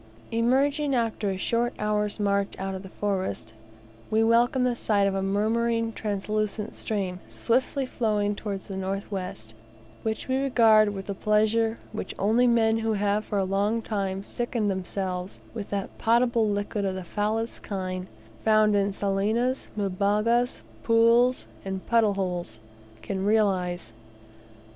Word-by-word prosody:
Emerging 275 Hz, +5 st, +2 dB
after 225 Hz, -3 st, 0 dB
a 190 Hz, -, -2 dB
short 235 Hz, +5 st, 0 dB
hour's 210 Hz, 0 st, 0 dB
march 200 Hz, -1 st, 0 dB
out 195 Hz, 0 st, -3 dB
of 190 Hz, -, -5 dB
the 190 Hz, -, -10 dB
forest, 185 Hz, -, -3 dB, 0.6 s
we 220 Hz, +1 st, +3 dB
welcome 240 Hz, +3 st, +3 dB
the 250 Hz, -1 st, +1 dB
sight 205 Hz, -3 st, +2 dB
of 195 Hz, -, +1 dB
a 195 Hz, -, -1 dB
murmuring 225 Hz, +3 st, +1 dB
translucent 210 Hz, +1 st, -2 dB
stream, 190 Hz, -4 st, -3 dB
swiftly 260 Hz, +3 st, 0 dB
flowing 210 Hz, -4 st, 0 dB
towards 200 Hz, -2 st, -5 dB
the 195 Hz, -, -6 dB
north 195 Hz, +2 st, -3 dB
west, 180 Hz, -, -5 dB, 0.5 s
which 220 Hz, -1 st, -3 dB
we 260 Hz, 0 st, +1 dB
regard 225 Hz, -6 st, +5 dB
with 195 Hz, -2 st, -5 dB
the 200 Hz, -, -3 dB
pleasure 220 Hz, +2 st, +2 dB
which -, -, -5 dB
only 225 Hz, +5 st, +3 dB
men 225 Hz, -1 st, +3 dB
who 225 Hz, 0 st, 0 dB
have 205 Hz, +1 st, +1 dB
for 205 Hz, -, -3 dB
a 195 Hz, -, +2 dB
long 200 Hz, +4 st, +1 dB
time 195 Hz, -3 st, -2 dB
sickened 235 Hz, -2 st, -1 dB
themselves 185 Hz, 0 st, -4 dB
with 215 Hz, -3 st, -6 dB
that 200 Hz, -1 st, -3 dB
potable 235 Hz, -1 st, +3 dB
liquid 205 Hz, 0 st, -2 dB
of 190 Hz, -1 st, -1 dB
the 190 Hz, -, -5 dB
foulest 215 Hz, +5 st, -2 dB
kind, 185 Hz, -2 st, -4 dB, 0.4 s
found 215 Hz, -1 st, +4 dB
in 200 Hz, 0 st, +2 dB
salinas, 210 Hz, +6 st, 0 dB
mbugas, 210 Hz, +5 st, +1 dB, 0.2 s
pools, 230 Hz, +2 st, +4 dB, 0.2 s
and 190 Hz, -1 st, -5 dB
puddle 225 Hz, -4 st, +3 dB
holes, 180 Hz, -, -3 dB, 0.5 s
can 190 Hz, -1 st, -3 dB
realize. 185 Hz, -, +1 dB
210 Hz, 145 wpm, -26 LUFS, 195-230 Hz, 0.6 s, regard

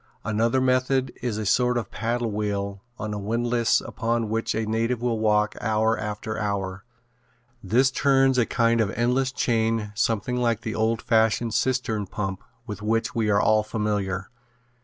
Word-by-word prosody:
Another 115 Hz, +4 st, +1 dB
method 130 Hz, 0 st, +1 dB
is 120 Hz, -3 st, -2 dB
a 110 Hz, -, -3 dB
sort 125 Hz, +4 st, +2 dB
of 120 Hz, -, -1 dB
a -, -, -33 dB
paddle 115 Hz, 0 st, -2 dB
wheel 100 Hz, -1 st, -3 dB
on 110 Hz, -1 st, -4 dB
a 105 Hz, -, -3 dB
windlass 115 Hz, +3 st, +1 dB
upon 115 Hz, -1 st, -2 dB
which 115 Hz, +1 st, -1 dB
a 110 Hz, 0 st, -1 dB
native 115 Hz, +2 st, 0 dB
will 120 Hz, -2 st, -1 dB
walk 105 Hz, -1 st, +2 dB
hour 110 Hz, +1 st, +2 dB
after 105 Hz, 0 st, -4 dB
hour. 95 Hz, -2 st, -3 dB, 0.8 s
This 125 Hz, +7 st, +3 dB
turns 135 Hz, -2 st, +3 dB
a 115 Hz, -, +2 dB
kind 115 Hz, -1 st, +2 dB
of 105 Hz, -, +1 dB
an -, -, -6 dB
endless 125 Hz, +3 st, +1 dB
chain 115 Hz, -4 st, 0 dB
something 115 Hz, +1 st, 0 dB
like 115 Hz, -2 st, +1 dB
the 110 Hz, -1 st, -4 dB
old 110 Hz, 0 st, 0 dB
fashioned 115 Hz, -1 st, +2 dB
cistern 120 Hz, -6 st, 0 dB
pump 95 Hz, -1 st, -4 dB, 0.2 s
with 105 Hz, -4 st, -7 dB
which 115 Hz, +2 st, 0 dB
we 110 Hz, -2 st, 0 dB
are 100 Hz, -1 st, +4 dB
all 110 Hz, +1 st, +4 dB
familiar. 105 Hz, -3 st, -2 dB
110 Hz, 170 wpm, -25 LUFS, 105-120 Hz, 0.8 s, are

